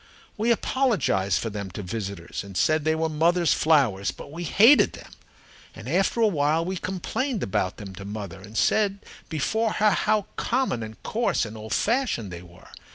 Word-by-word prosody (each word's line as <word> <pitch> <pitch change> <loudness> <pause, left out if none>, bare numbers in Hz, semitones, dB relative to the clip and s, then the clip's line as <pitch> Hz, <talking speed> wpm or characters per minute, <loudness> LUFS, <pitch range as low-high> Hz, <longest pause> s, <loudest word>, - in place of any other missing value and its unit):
We 225 +2 0
apologized 200 - +1
for 115 - -3
them 100 -2 -5
to 105 - -4
visitors 100 -3 -5
and 100 -2 -8
said 155 -1 +2
they 160 0 +2
were 160 0 0
mother's 170 +2 +2
flowers, 130 -12 +2
but - - -8
we 170 +3 -6
hated 230 - +6
them. - - -12 0.6
And - - -10
after 195 +4 +1
a 225 - +6
while 160 -2 +1
we 185 +1 -3
complained 190 +7 -3
about 95 0 -1
them 100 -2 -8
to 95 +1 -9
mother 100 -3 -7
and 105 +2 -9
said 200 - +2 0.3
before 220 +9 0
her 215 0 +3
how 210 0 +1
common 250 - 0
and 110 0 -9
coarse 230 - 0
and 105 0 -8
old 110 0 -4
fashioned 220 - 0
they 85 -1 -7
were. 85 -1 -16
155 Hz, 180 wpm, -25 LUFS, -, 0.6 s, hated